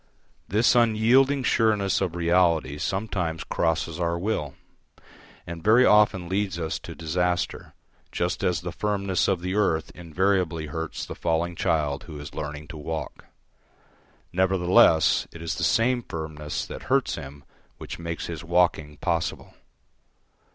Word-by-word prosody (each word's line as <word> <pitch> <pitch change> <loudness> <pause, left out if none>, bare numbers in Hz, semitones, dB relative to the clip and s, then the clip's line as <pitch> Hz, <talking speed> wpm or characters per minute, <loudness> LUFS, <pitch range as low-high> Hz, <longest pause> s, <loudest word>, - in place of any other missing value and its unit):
This 110 +5 +3
unyielding 120 +4 +4
sureness 105 -6 +2
of 90 -3 -1
reality 85 -4 +2
sometimes 90 -3 -2
crosses 80 0 -1
our 85 -1 0
will, 85 -7 -2 0.9
and 85 -1 -7
very 115 +4 +6
often 105 -4 +4
leads 95 -1 -1
us 80 -2 -3
to - - -9
disaster, 90 +2 -2 0.4
just 90 +1 -2
as 90 -2 +1
the 90 0 -5
firmness 100 -2 0
of 95 -3 0
the 90 +1 -3
earth 90 -6 +1
invariably 90 -1 0
hurts 80 +2 -5
the - - -7
falling 85 +1 -1
child 75 -4 0
who 75 -3 -8
is 75 - -9
learning 75 0 -6
to 80 - -8
walk. 75 -1 -6 1.1
Nevertheless 90 -3 +4
it 85 - -11
is 80 0 -3
the - - -4
same 120 +2 +2
firmness 80 -6 -5
that - - -8
hurts - - +2
him 70 +1 -8 0.3
which - - -8
makes 85 0 -4
his 85 -1 -6
walking 85 -4 +1
possible. 85 0 -2
85 Hz, 135 wpm, -25 LUFS, 80-95 Hz, 1.1 s, very